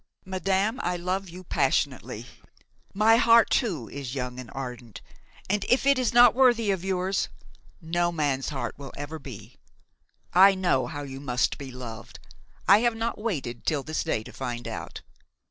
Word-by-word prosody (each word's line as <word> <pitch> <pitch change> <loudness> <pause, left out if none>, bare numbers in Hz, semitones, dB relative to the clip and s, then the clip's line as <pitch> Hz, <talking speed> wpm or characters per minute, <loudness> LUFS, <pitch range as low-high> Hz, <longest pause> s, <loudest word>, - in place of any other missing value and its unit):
"Madame, 190 +5 0
I 180 0 -1
love 185 +2 -3
you 180 +2 -10
passionately; - - -1 0.7
my 215 +3 +4
heart 230 -1 +5
too 175 - 0
is 140 -2 -6
young 125 -1 -4
and 125 -3 -8
ardent, 125 -4 -7 0.5
and, 200 +1 0
if 255 +2 +3
it 280 -1 +4
is 250 - +1
not 240 -1 +7
worthy 240 -5 +4
of 190 -2 -2
yours, 190 0 -1 0.5
no 175 +1 0
man's 145 -5 -1
heart 140 -3 -4
will 140 -1 -9
ever 150 +2 -6
be. 130 -7 -11 0.8
I 195 +3 +7
know 175 -9 +1
how 145 -1 -6
you 135 -1 -7
must 125 -3 0
be 135 -2 -7
loved; 120 -3 -9 0.5
I 200 +2 +8
have 235 0 +1
not 225 0 -3
waited 145 - -3
until 140 +3 -1
this 155 +1 -2
day 110 - -1
to - - -12
find 120 -1 -5
out. - - -6
175 Hz, 165 wpm, -26 LUFS, 135-205 Hz, 0.8 s, I